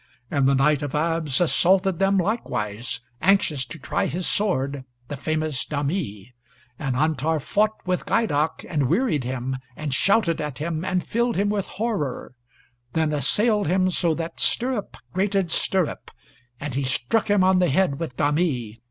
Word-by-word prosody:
And 140 -2 +2
the 140 - +4
Knight 145 +2 +3
of 145 -1 -3
Abs 160 -2 +1
assaulted 185 +1 +3
them 195 0 +3
likewise, 120 - -2 0.2
anxious 185 -8 +3
to - - -8
try 140 - -1
his 175 +5 -3
sword, 140 -9 0 0.3
the 145 - -3
famous 155 -1 -1
Dhami. 145 - -3 0.5
And 135 -3 -1
Antar 155 +2 +1
fought 210 +8 +1
with 180 -1 -1
Gheidac, 160 -9 +1
and 145 -6 0
wearied 170 - +1
him, 130 +1 -3 0.2
and 150 -3 -3
shouted 185 - +2
at 150 -3 -4
him, 160 +1 -3
and 185 -1 -1
filled 235 +1 0
him 200 +1 +1
with 205 -2 -1
horror; 190 - -3 0.6
then 160 -1 +1
assailed 205 - +2
him 185 +2 +2
so 170 -2 +1
that 165 +1 -5
stirrup 245 -4 0 0.2
grated 190 -2 0
stirrup; 185 0 0 0.5
and 145 -2 -4
he 140 - -1
struck 130 - 0
him 205 -2 +4
on 185 0 +4
the 180 - +3
head 140 -1 +1
with 160 -7 -5
Dhami. 145 -7 0
160 Hz, 160 wpm, -24 LUFS, 140-190 Hz, 0.6 s, the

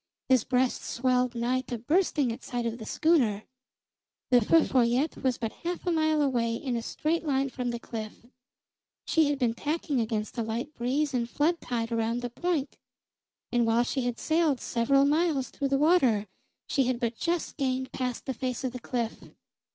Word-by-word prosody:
His 255 -4 +5
breast 250 0 +1
swelled 250 0 0
nigh 245 +2 0
to 245 - -3
bursting 295 - +1
at 235 +3 -6
sight 240 -1 -3
of 230 +1 -3
the 220 - -8
schooner. 245 -11 +2 0.9
The 245 -1 +6
Feu 325 +8 +5
Follette 255 +4 +2
was 255 -2 +1
but 225 -2 -3
half 350 +2 -4
a 355 - +1
mile 315 -2 +2
away 235 -4 +1
in 250 +1 -3
a 230 - -1
straight 315 +8 -1
line 275 -3 +1
from 250 -1 -3
the 235 - -2
cliff; 225 -1 -7 0.8
she 320 -3 +3
had 290 - 0
been 245 -4 +1
tacking 295 +1 -1
against 220 +1 -3
a - - +2
light 235 +7 -3
breeze 275 +4 -1
and 240 -2 -1
flood 330 +6 +1
tide 235 -1 -3
around 230 +1 -1
the 245 - -3
Point, 315 -1 -2 0.7
and 240 -1 +2
while 230 +1 +3
she 260 +2 -1
had 245 -1 -2
sailed 315 -5 +1
several 275 +4 +2
miles 295 -2 +1
through 280 - -2
the 275 - +2
water, 270 - +3 0.4
she 270 - +1
had 250 -1 0
but 235 -1 -1
just 340 +6 -2
gained 260 -2 -1
past 250 -2 -3
the 265 - -2
face 255 0 -3
of 260 - -1
the 250 - -5
cliff. 235 -2 -4
255 Hz, 190 wpm, -28 LUFS, 235-290 Hz, 0.9 s, The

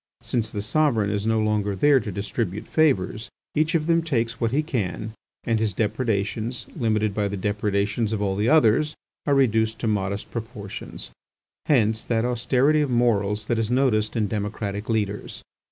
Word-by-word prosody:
Since 115 -3 -1
the 105 -2 -4
sovereign 115 -5 +2
is 105 +1 -1
no 110 0 +2
longer 105 -2 0
there 140 +7 +5
to 110 - -5
distribute 100 +1 -3
favours, 115 - +1 0.2
each 155 +3 +1
of 155 -2 +1
them 165 0 +3
takes 115 -7 -1
what 115 - +2
he 145 +6 +1
can, 110 - -3 0.3
and 115 -2 +1
his 110 -4 -1
depredations, 110 +1 -1
limited 110 - +1
by 105 0 0
the 100 0 -4
depredations 105 +2 0
of 110 - -1
all 100 -2 0
the 105 +4 +1
others, 150 0 +4 0.3
are 140 - +4
reduced 110 -4 +2
to 115 - 0
modest 100 -1 -2
proportions. 110 -3 -6 0.6
Hence 110 -5 +3
that 115 0 0
austerity 130 +5 +2
of 145 - 0
morals 105 -4 +1
that 115 0 0
is 110 -1 -1
noticed 125 -4 +2
in 110 -3 +1
democratic 105 0 -3
leaders. 105 -2 -2
110 Hz, 170 wpm, -24 LUFS, 105-125 Hz, 0.6 s, there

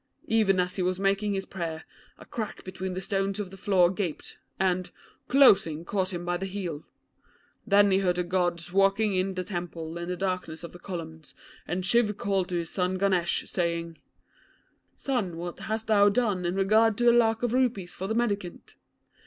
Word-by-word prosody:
Even 210 -4 +3
as 180 +1 -1
he - - 0
was 180 +1 0
making 200 +1 +1
his 195 - -3
prayers, 165 -4 -5 0.3
a - - -13
crack 220 -3 -5
between 185 0 -5
the 185 - -3
stones 195 +1 -1
of 195 -3 -4
the - - -9
floor 185 -2 +3
gaped, 185 -5 -5 0.2
and, 185 -1 +1 0.4
closing, 190 - +5
caught 190 0 -1
him 175 -1 -5
by 175 0 0
the 195 +2 -4
heel. 180 -6 -5 0.8
Then 205 -1 +5
he 190 - +4
heard 180 -2 +1
the 180 - 0
Gods 175 -1 -1
walking 195 +2 +3
in 185 +1 0
the 185 - -2
temple 170 -3 -5
in 170 +1 -5
the 180 - -2
darkness 180 -4 -3
of 170 - -7
the 175 - -11
columns, 160 -4 -8 0.3
and 180 +2 -2
Shiv 210 -1 +2
called 195 -2 0
to 175 - -1
his 170 -1 -4
son 185 0 0
Ganesh, 185 -3 +1
saying 170 -2 -2 1.0
"Son, 220 -11 -2
what 175 +1 -6
hast 220 +1 -3
thou 205 -2 +5
done 205 -5 0
in 175 +2 -1
regard 215 +3 +3
to 240 - 0
the 240 0 +6
lakh 225 -1 +3
of 240 -1 0
rupees 240 -9 0
for 190 - -5
the 220 - -1
mendicant?" 205 -7 -2
190 Hz, 190 wpm, -27 LUFS, 175-205 Hz, 1.0 s, the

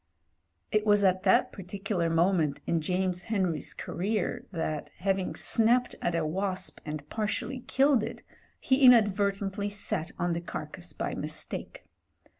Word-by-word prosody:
It 215 0 +2
was 205 -1 +4
at 185 -1 +3
that 190 - +4
particular 195 -2 -3
moment 165 -3 +2
in 165 -1 +1
James 180 +2 -1
Henry's 185 -8 -1
career 200 +2 -2
that, 160 -4 -3
having 190 0 -1
snapped 240 +2 +3
at 175 - 0
a 165 -2 0
wasp 190 +4 -2
and 150 -1 -6
partially 220 +4 -2
killed 270 -2 +4
it, - - -6 0.4
he 265 +1 +2
inadvertently 205 -4 +4
sat 200 -5 -2
on 175 0 0
the 170 - -2
carcase 170 - -6
by - - -3
mis - - -2
take. - - -7
195 Hz, 140 wpm, -29 LUFS, 170-210 Hz, 0.4 s, was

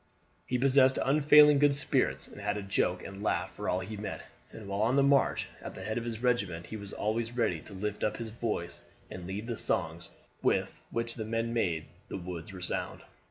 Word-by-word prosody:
He 125 - +1
possessed 130 0 +5
unfailing 150 +1 +7
good 145 -1 +5
spirits, 140 - +1
and - - -11
had 105 - -1
a 105 - -4
joke 90 -2 0
and 100 0 -8
laugh 105 - 0
for - - -4
all 90 - +1
he 105 +4 -6
met; 105 +1 -5 0.3
and 105 - -10
while 100 +1 -2
on 115 +4 +3
the 140 - +5
march 140 0 +3
at - - -7
the - - -7
head 110 +2 -1
of 115 - -6
his 115 0 -5
regiment 100 -9 +1
he - - -7
was 100 -2 -7
always 115 +2 -1
ready 100 -9 +1
to - - -12
lift 105 +2 -3
up 105 0 0
his 115 -1 -5
voice 110 -6 -3 0.3
and 90 -1 -7
lead 100 +4 -4
the 115 -2 -4
songs 80 +2 -2 0.3
with - - 0
which 115 0 -2
the 115 - -4
men 115 +1 -1
made 85 -9 0 0.2
the - - -5
woods 90 0 -6
resound. 90 -2 -3
110 Hz, 210 wpm, -30 LUFS, 95-120 Hz, 0.3 s, unfailing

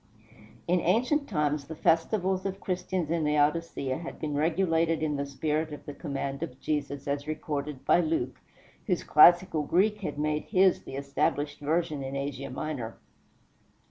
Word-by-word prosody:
In 180 +1 +3
ancient 250 - +1
times 150 -5 0
the 160 +3 -7
festivals 185 +4 +1
of 195 0 -3
Christians 180 -3 -2
in 170 -1 +1
Laodicea 150 -2 +1
had 170 - -7
been 150 -2 -3
regulated 165 +1 +1
in 150 -2 0
the 140 0 -2
spirit 155 +2 -1
of 150 - -9
the 145 - -6
command 140 -3 -4
of 125 - -5
Jesus, 145 -2 -3
as 140 +1 -2
recorded 150 -2 -4
by - - +5
Luke, 155 -7 -1 0.5
whose - - 0
classical 175 +1 +6
Greek 205 +8 +2
had 150 -7 -4
made 150 0 -1
his 190 -2 +3
the - - -7
established 140 +1 -1
version 155 0 -1
in 135 0 -5
Asia 140 -1 -4
Minor. 130 -4 -4
155 Hz, 155 wpm, -28 LUFS, 140-175 Hz, 0.5 s, classical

